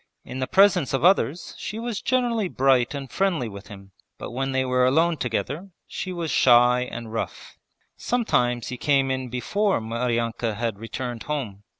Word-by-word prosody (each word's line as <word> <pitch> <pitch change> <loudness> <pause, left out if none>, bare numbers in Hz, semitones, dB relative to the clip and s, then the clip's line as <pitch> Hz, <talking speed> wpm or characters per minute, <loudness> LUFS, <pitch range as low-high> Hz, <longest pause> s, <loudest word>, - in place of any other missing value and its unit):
In 130 - -6
the 130 - -1
presence 190 -8 +4
of 135 - -2
others 175 -3 +2
she 215 - -5
was 230 -2 -4
generally 240 -5 +1
bright 135 -3 +2
and 140 -1 -5
friendly 180 -10 0
with 100 -1 -10
him, 100 -1 -12 0.3
but - - -7
when 135 +2 -2
they 130 0 +1
were 125 0 +2
alone 160 +6 +3
together 140 - -3 0.2
she 185 - -5
was 170 -3 -3
shy 125 0 +5
and 115 -1 -7
rough. 115 - -5 0.4
Sometimes 125 - 0
he 125 - -5
came 135 -1 +2
in 130 -1 -3
before 195 - 0
Maryanka 115 0 -2
had 115 -2 -3
returned 120 +1 -5
home. 125 -10 -4
130 Hz, 170 wpm, -24 LUFS, 120-170 Hz, 0.4 s, shy